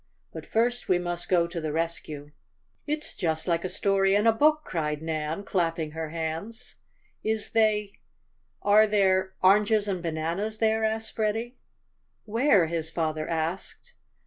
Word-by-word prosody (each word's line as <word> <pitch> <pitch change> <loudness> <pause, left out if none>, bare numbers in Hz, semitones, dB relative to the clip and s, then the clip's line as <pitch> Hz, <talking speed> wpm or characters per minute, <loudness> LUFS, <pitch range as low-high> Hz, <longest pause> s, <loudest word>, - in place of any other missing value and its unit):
But - - -8
first 240 +2 0
we 185 - +4
must 175 0 -4
go 175 -2 +4
to 170 0 -5
the 155 -1 -3
rescue." 155 -2 -4 0.6
"It's 300 +1 -3
just 160 -2 -2
like 170 -1 +1
a 185 - -2
story 195 0 +2
in 205 +2 +2
a 225 - +7
book!" 305 +6 +3
cried 150 -3 -2
Nan, 160 +3 -3
clapping 165 -5 -1
her 160 0 -5
hands. 165 +9 -5 0.5
"Is 220 -1 -1
they 210 -2 +1 0.6
are 210 +1 +6
there 190 -2 +2
oranges 210 +2 +4
and 185 -3 -2
bananas 170 +6 -2
there?" 220 0 +1
asked 220 0 -2
Freddie. 225 +3 -1 0.7
"Where?" 225 - +3
his 160 -1 -2
father 155 -1 -2
asked. 170 - -4
190 Hz, 145 wpm, -27 LUFS, 165-220 Hz, 0.7 s, a